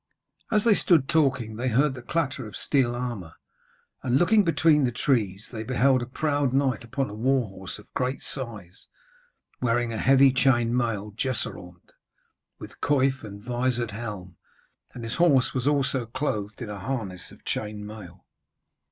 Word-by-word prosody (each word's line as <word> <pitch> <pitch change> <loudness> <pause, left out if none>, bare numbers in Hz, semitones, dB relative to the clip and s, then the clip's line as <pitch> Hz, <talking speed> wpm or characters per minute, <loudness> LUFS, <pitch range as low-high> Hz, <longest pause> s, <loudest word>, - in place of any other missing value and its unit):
As 210 -1 +3
they 230 - +5
stood 165 -9 +3
talking, 130 -9 +1
they 125 +2 -2
heard 135 +4 +3
the 125 - -8
clatter 140 -3 -2
of 105 - -10
steel 125 -4 +1
armour, 120 -10 -5 0.7
and 130 -1 +2
looking 210 +7 +4
between 160 -3 +3
the 125 - +2
trees, 110 -6 0
they 110 -3 -5
beheld 130 +2 +2
a 120 - -4
proud 145 0 0
knight 135 -4 +1
upon 130 +4 -2
a 105 - -8
war 125 +2 +1
horse 95 -1 -8
of 105 - -17
great 130 +1 -1
size, 105 -9 -7 0.7
wearing 120 -1 +1
a 110 - -3
heavy 135 0 +5
chain 120 -3 +3
mail 110 -4 -1
jesseraunt, 90 -8 -4 0.7
with - - -12
coif 135 -2 +2
and 100 -1 -9
vizored 120 -1 -1
helm, 100 -5 -7 0.6
and 120 - -7
his 115 +1 -4
horse 150 -7 +4
was 130 0 -1
also 135 -4 +1
clothed 110 -4 -3
in 110 - -6
harness 100 -3 -4
of - - -17
chain 105 -1 -3
mail. 105 0 -11
125 Hz, 160 wpm, -26 LUFS, 110-135 Hz, 0.7 s, they